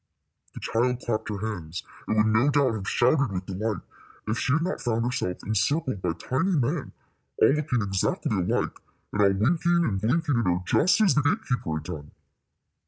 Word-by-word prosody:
The - - -6
child 125 +2 0
clapped 110 -3 -2
her 105 - -3
hands, 90 -6 -5 0.2
and 110 - 0
would 105 - +4
no 110 +6 +3
doubt 140 -4 +3
have 100 -3 -3
shouted 130 -1 +2
with 95 -1 -4
delight 100 +1 -3 0.4
if 110 +2 -1
she 130 - +1
had 160 +3 +2
not 185 -7 -2
found 115 -1 0
herself 120 -7 -2
encircled 120 - 0
by 90 -2 0
tiny 130 - -1
men, 135 -8 0 0.5
all - - +6
looking 140 -6 0
exactly 95 +1 -1
alike, 90 -2 -1 0.3
and 105 - +1
all 100 - +6
winking 170 - +2
and 95 -3 -1
blinking 145 +3 +1
at 115 - 0
her 90 0 +2
just 180 - +3
as 200 -8 +5
the 150 - +3
gate 205 +11 0
keeper 105 -11 -1
had 80 - -4
done. 75 -1 -7
115 Hz, 190 wpm, -26 LUFS, 100-145 Hz, 0.5 s, all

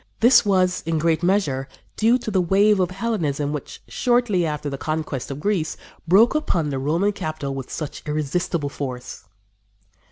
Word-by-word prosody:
This 240 +2 +6
was, 185 -2 +2
in 165 -1 +1
great 160 +1 +1
measure, 175 -8 +1 0.3
due 230 +3 +3
to 230 -3 -5
the 190 -2 +2
wave 200 +3 +3
of 180 -2 +2
Hellenism 170 -9 -2
which, 150 - -7
shortly 240 -8 +1
after 150 -1 -3
the 140 -1 -4
conquest 155 -5 -3
of 140 0 -5
Greece, 175 -3 -1 0.3
broke 205 +7 +5
upon 180 - 0
the 135 - -2
Roman 165 +9 +1
capital 155 -7 -4
with 135 -2 -6
such 155 -3 -5
irresistible 150 +1 -1
force. 125 -5 -6
165 Hz, 160 wpm, -22 LUFS, 145-200 Hz, 0.3 s, This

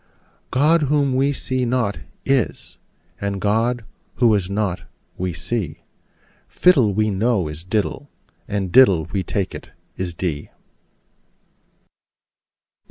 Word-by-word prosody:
God, 155 +6 +3
whom 140 -3 +2
we 135 +2 +2
see 130 -2 -2
not, 120 -4 0 0.3
is: 135 -4 -1 0.4
and 100 -1 -2
God, 115 +3 0 0.3
who 115 -2 +4
is 95 -3 0
not, 100 -3 -1 0.3
we 90 0 -2
see: 90 -1 -4 0.7
Fiddle, 140 - +4
we 110 +2 +1
know, 100 -3 +1
is 75 +2 -7
diddle: 110 +9 -2 0.4
and 100 -4 -2
diddle, 95 -10 +6
we 95 - 0
take 95 +1 -2
it, - - -9 0.3
is 90 -2 -4
dee. 80 -5 -3
105 Hz, 115 wpm, -21 LUFS, 95-130 Hz, 0.7 s, diddle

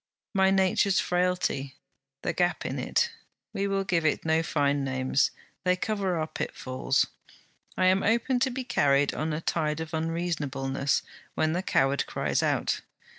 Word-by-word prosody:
'My 190 -1 +4
nature's 190 0 +3
frailty, 180 -7 0 0.5
the - - 0
gap 175 0 0
in - - -3
it: 470 - +1 0.4
we 200 +1 -1
will 195 0 0
give 170 -3 +1
it 155 - +1
no 160 0 +3
fine 145 -3 +1
names 130 0 +1 0.3
they 180 0 +3
cover 195 -2 -1
our 155 - 0
pitfalls. 130 -3 -1 0.7
I 185 - +3
am 185 +1 +4
open 235 +3 +2
to 265 +1 +2
be 260 +1 -4
carried 140 - +2
on 155 +1 -2
a 155 +1 -2
tide 155 -2 -1
of 160 0 -6
unreasonableness 150 -5 -1 0.3
when 155 0 +1
the 180 - 0
coward 135 -6 +1
cries - - 0
out. - - 0
165 Hz, 155 wpm, -28 LUFS, 140-190 Hz, 0.7 s, My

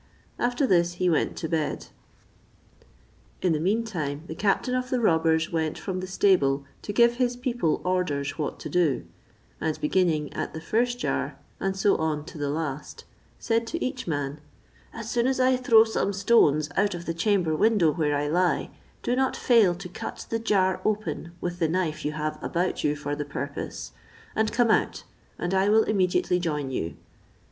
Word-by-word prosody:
After 245 +3 +1
this 175 -6 +3
he 180 0 +1
went 160 - +1
to 160 - -3
bed. 160 -2 -2 1.6
In 180 -3 +3
the 155 - 0
mean 205 +8 +1
time 155 -9 -4
the 160 - -6
captain 205 +7 0
of 255 0 -1
the 255 - +1
robbers 160 -5 +2
went 160 -2 -1
from 185 -2 -4
the 185 - -5
stable 145 -8 +2 0.2
to - - -5
give 235 +2 +4
his 245 -1 +1
people 245 - 0
orders 180 -7 0
what 150 - -3
to - - -5
do; 170 -7 +1 0.6
and 160 -1 -1
beginning 155 -2 +1
at - - -4
the - - -4
first 240 +8 0
jar, 245 - -2 0.2
and 195 0 -1
so 195 +1 +3
on 155 -2 -1
to 165 -2 -10
the 145 -1 -1
last, 150 -1 -4 0.3
said 230 0 0
to 335 +7 -2
each 255 -3 -4
man: 145 -2 -3 0.5
"As 230 -1 -7
soon 240 +1 +2
as 265 0 0
I 255 0 +4
throw 235 -3 +6
some 220 -3 -1
stones 155 -8 +4
out 200 -1 +2
of 170 0 -7
the 165 - -2
chamber 175 -2 +1
window 200 -3 +3
where 150 -3 0
I 145 +1 0
lie, 175 +4 +1 0.3
do 245 - +1
not 265 0 +1
fail 220 -8 +4
to 180 +1 -8
cut 180 - -7
the 225 - 0
jar 195 -4 +1
open 210 -5 -2
with 175 0 -4
the 165 - +2
knife 160 -3 -1
you 150 - -2
have 155 0 -3
about 180 +1 -1
you 150 0 +2
for 145 0 -3
the 145 - -3
purpose, 145 0 -5 0.4
and 220 0 +1
come 240 -2 +3
out, - - +1 0.3
and 175 +2 -2
I 190 +1 +3
will 220 +1 +5
immediately 185 -3 +1
join 150 -6 -2
you." 85 -9 -3
180 Hz, 185 wpm, -26 LUFS, 155-220 Hz, 1.6 s, throw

